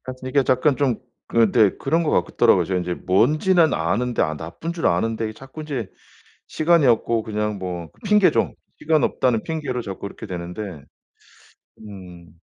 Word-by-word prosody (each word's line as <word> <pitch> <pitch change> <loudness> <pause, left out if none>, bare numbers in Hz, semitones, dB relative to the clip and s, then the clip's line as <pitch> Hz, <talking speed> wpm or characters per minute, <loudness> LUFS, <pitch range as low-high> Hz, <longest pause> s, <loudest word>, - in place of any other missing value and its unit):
하여튼 130 0 -7
이게 140 +1 +3
잠깐 130 +2 +2
좀 130 -6 +1 0.3
그 115 -3 +3
네. 105 -4 +5
그런 165 +5 +1
것 155 - 0 0.2
같더라고요. - - +3
제가 95 -1 -1
이제 90 0 -3
뭔지는 155 - +2
아는데 115 +10 -1
아 80 0 0
나쁜 85 - -6
줄 165 - -1
아는데 110 +5 0
자꾸 135 +7 -10
인제 130 -10 -5 0.6
시간이 165 -1 +2
없고 115 -1 +2
그냥 105 -1 -3
뭐 90 -3 -5
그 - - -28
핑계죠. 210 -2 +3 0.3
시간 155 -1 +1
없다는 120 -4 +1
핑계로 145 -6 -3
자꾸 100 -4 -7
이렇게 - - -9
되는데 90 +1 -6 1.3
음. 90 -4 -13
115 Hz, 325 characters per minute, -22 LUFS, 95-145 Hz, 1.3 s, 네